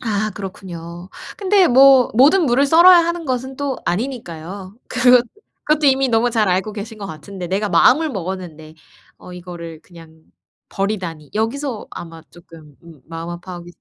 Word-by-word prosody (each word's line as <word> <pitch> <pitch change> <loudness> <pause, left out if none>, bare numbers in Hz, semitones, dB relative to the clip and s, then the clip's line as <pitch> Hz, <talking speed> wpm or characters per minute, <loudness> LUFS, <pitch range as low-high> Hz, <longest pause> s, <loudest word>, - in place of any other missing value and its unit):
아 215 -2 -2
그렇군요. 175 -3 -9 0.3
근데 395 -1 +3
뭐 265 -1 +6
모든 300 - +4
무를 265 +3 +2
썰어야 345 +4 +7
하는 340 0 -1
것은 260 -1 -4
또 280 -1 -3
아니니까요. 190 -4 -5
그것 250 -1 +4 0.4
그것도 305 -1 +1
이미 270 -1 +3
너무 235 +1 +1
잘 220 -3 +1
알고 190 +4 -1
계신 215 +2 -8
것 200 - -6
같은데 180 +2 -8
'내가 200 +3 -1
마음을 255 - +4
먹었는데 175 - -7 0.4
어 180 - -13
이거를 170 -3 -9
그냥 165 -2 -17 0.5
버리다니.' 185 -7 -4
여기서 230 +2 -3
아마 165 -1 -10
쪼끔 165 -3 -16
음 165 -4 -16
마음 165 +1 -7
아파하고 175 0 -9
205 Hz, 330 characters per minute, -19 LUFS, 170-260 Hz, 0.5 s, 썰어야